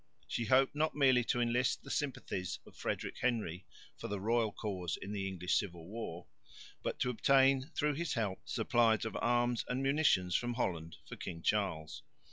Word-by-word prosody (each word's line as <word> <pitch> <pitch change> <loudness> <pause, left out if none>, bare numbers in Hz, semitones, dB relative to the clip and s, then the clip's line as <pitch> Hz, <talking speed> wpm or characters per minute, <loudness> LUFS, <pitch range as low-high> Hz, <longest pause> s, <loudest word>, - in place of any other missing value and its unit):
She 115 - -2
hoped 130 +4 +4
not 155 +1 0
merely 130 -4 +5
to 120 - 0
enlist 120 +1 +1
the - - -7
sympathies 125 - -2
of - - -16
Frederick - - -3
Henry 105 -8 -1 0.3
for - - -6
the 100 -1 -3
royal 115 +1 +1
cause 95 -5 -3
in 100 - -6
the 100 -2 -2
English 90 -2 -2
civil 85 -4 -6
war, 95 -5 -6 0.6
but - - -3
to 125 - +2
obtain 135 +3 +4
through 150 0 +1
his 165 +2 -2
help 105 -5 -1
supplies 115 -2 +2
of 110 - -4
arms 120 0 +2
and 130 +2 -1
munitions 135 - +3
from 120 0 0
Holland 85 -8 -2
for - - -8
King 85 0 -6
Charles. 95 -7 0
115 Hz, 175 wpm, -34 LUFS, 95-130 Hz, 0.6 s, merely